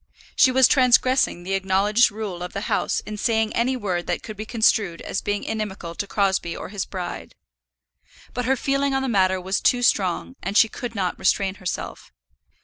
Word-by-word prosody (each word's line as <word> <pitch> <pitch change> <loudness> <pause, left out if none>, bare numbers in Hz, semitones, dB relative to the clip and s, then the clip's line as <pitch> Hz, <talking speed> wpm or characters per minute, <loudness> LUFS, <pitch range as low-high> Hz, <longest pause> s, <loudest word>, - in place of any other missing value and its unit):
She 270 - +6
was 260 -1 +6
transgressing 255 -6 +3
the 190 +2 -3
acknowledged 195 +4 +3
rule 205 -4 -6
of 180 - -6
the 200 - -3
house - - -1
in 210 0 -7
saying 220 0 0
any 255 +2 +1
word 185 -6 -3
that - - -2
could 215 - -8
be 215 +1 -7
construed 215 -6 +1
as - - -3
being 205 0 -2
inimical 210 -6 -4
to 200 +4 -4
Crosbie 190 -4 0
or - - -7
his 200 -1 -4
bride. 180 -2 -6 1.0
But 245 - -3
her 265 +2 +2
feeling 275 +1 0
on 270 - 0
the - - -1
matter 190 -5 +2
was 190 +2 -2
too 245 -1 +2
strong, 200 +4 +1
and 200 +2 -1
she 225 - +6
could 240 -1 -6
not 185 -3 -2
restrain 190 0 +1
herself. 180 - -5
205 Hz, 190 wpm, -23 LUFS, 190-240 Hz, 1.0 s, She